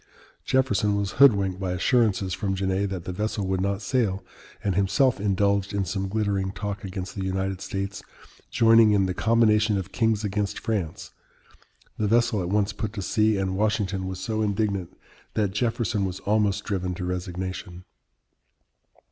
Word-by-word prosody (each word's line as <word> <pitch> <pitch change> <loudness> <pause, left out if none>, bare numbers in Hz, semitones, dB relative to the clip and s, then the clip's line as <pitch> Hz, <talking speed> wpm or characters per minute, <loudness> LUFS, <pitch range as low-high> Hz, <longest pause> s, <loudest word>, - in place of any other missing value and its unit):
Jefferson 105 -6 +1
was 100 -1 -1
hoodwinked 100 -8 +5
by 95 -2 -2
assurances 100 -1 +1
from 95 +1 -2
Genet 95 +1 0
that 95 -3 -5
the - - -3
vessel 105 +1 -2
would 95 0 -1
not 100 +1 -1
sail, 100 -4 0 0.4
and 100 - +1
himself 100 +7 +2
indulged 100 0 +1
in 100 -1 0
some 95 +2 -2
glittering 100 -2 -1
talk 100 +1 -5
against 95 -1 -5
the 95 - -4
United 95 0 -2
States 100 0 -4 0.5
joining 115 -2 +5
in 100 -2 +3
"the 90 - -1
combination 110 0 +3
of 95 0 -5
kings 110 +1 +1
against 105 0 -2
France." 100 -8 -3 0.9
The 105 - +1
vessel 115 -2 +2
at 85 - -3
once 105 +1 +1
put 105 0 -4
to 100 -4 -4
sea, 110 0 +2
and 95 -1 -1
Washington 100 -2 0
was 95 -1 -5
so 110 +4 -2
indignant 100 -3 -1 0.4
that 105 -3 +1
Jefferson 115 -1 0
was 95 -1 -3
almost 105 -2 +1
driven 90 -2 -2
to 90 0 -4
resignation. 90 0 -5
100 Hz, 160 wpm, -25 LUFS, 95-105 Hz, 0.9 s, hoodwinked